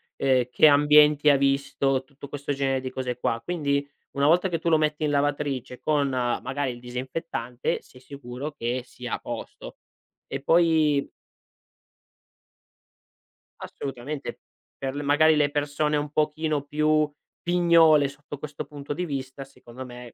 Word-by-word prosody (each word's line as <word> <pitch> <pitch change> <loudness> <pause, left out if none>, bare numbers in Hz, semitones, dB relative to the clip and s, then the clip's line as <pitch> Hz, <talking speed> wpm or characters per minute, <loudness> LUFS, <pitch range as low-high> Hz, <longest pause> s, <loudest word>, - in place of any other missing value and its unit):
ehm, 130 -2 +2
che 155 - +6
ambienti 150 0 +6
ha 140 - +6
visto, 135 -1 +1
tutto 140 +1 -12
questo 145 0 -3
genere 135 -1 0
di 130 - -4
cose 125 -2 -4
qua. 115 -1 -1
Quindi, 145 -5 -1 0.3
una 140 0 +1
volta 180 +4 +4
che 165 -2 -2
tu 170 - -1
lo 160 - +5
metti 155 0 0
in 150 - +1
lavatrice 140 -3 -1
con 145 -2 +1
magari 130 +2 -1
il 120 - -9
disinfettante, 125 0 -4
sei 125 - -18
sicuro 140 +1 -7
che 125 -1 -2
sia 125 0 -8
a - - -2
posto. - - -8 0.5
E 135 - -5
poi 160 -3 +3 2.5
Assolutamente, 135 +2 -6 0.4
per 135 0 -4
l 145 - -3
magari, 155 +2 +4
le 145 -1 +2
persone 150 +1 0
un 145 0 -2
pochino 155 -1 0
più 150 0 +1 0.3
pignole 170 -4 +5
sotto 145 0 -10
questo 150 0 -6
punto 145 0 -6
di 180 +4 -3
vista, 135 -2 -5
secondo 130 -1 -11
me 125 -1 -11
145 Hz, 145 wpm, -25 LUFS, 130-150 Hz, 2.5 s, che